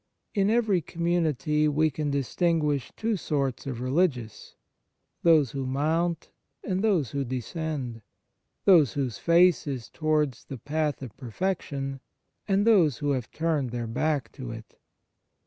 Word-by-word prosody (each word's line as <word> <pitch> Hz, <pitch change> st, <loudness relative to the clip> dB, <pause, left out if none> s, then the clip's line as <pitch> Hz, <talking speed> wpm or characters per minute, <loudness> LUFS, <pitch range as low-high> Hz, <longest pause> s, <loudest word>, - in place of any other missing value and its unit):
In 200 Hz, -1 st, +2 dB
every 220 Hz, -5 st, +2 dB
community 155 Hz, -3 st, 0 dB
we 155 Hz, +1 st, +2 dB
can 150 Hz, +1 st, -2 dB
distinguish 145 Hz, -1 st, 0 dB
two 220 Hz, -1 st, 0 dB
sorts 140 Hz, -6 st, -2 dB
of 125 Hz, -4 st, -4 dB
religious 130 Hz, -, -1 dB, 0.7 s
those 155 Hz, -7 st, +4 dB
who 135 Hz, -2 st, -3 dB
mount 160 Hz, +5 st, 0 dB, 0.3 s
and 185 Hz, -1 st, -1 dB
those 180 Hz, -, +2 dB
who 140 Hz, -1 st, -1 dB
descend 130 Hz, -1 st, -4 dB, 0.6 s
those 165 Hz, -, +6 dB
whose 130 Hz, -5 st, -2 dB
face 170 Hz, 0 st, +4 dB
is 130 Hz, -5 st, -4 dB
towards 155 Hz, -4 st, 0 dB
the 135 Hz, -, -7 dB
path 150 Hz, +2 st, -2 dB
of 115 Hz, -5 st, -9 dB
perfection, 135 Hz, -, -3 dB, 0.5 s
and 200 Hz, 0 st, +2 dB
those 175 Hz, -, +4 dB
who 145 Hz, -1 st, -1 dB
have 130 Hz, -4 st, -2 dB
turned 155 Hz, -5 st, -1 dB
their 120 Hz, 0 st, -3 dB
back 140 Hz, +5 st, -1 dB
to 130 Hz, -4 st, -8 dB
it. 115 Hz, -1 st, -10 dB
150 Hz, 135 wpm, -27 LUFS, 130-170 Hz, 0.7 s, those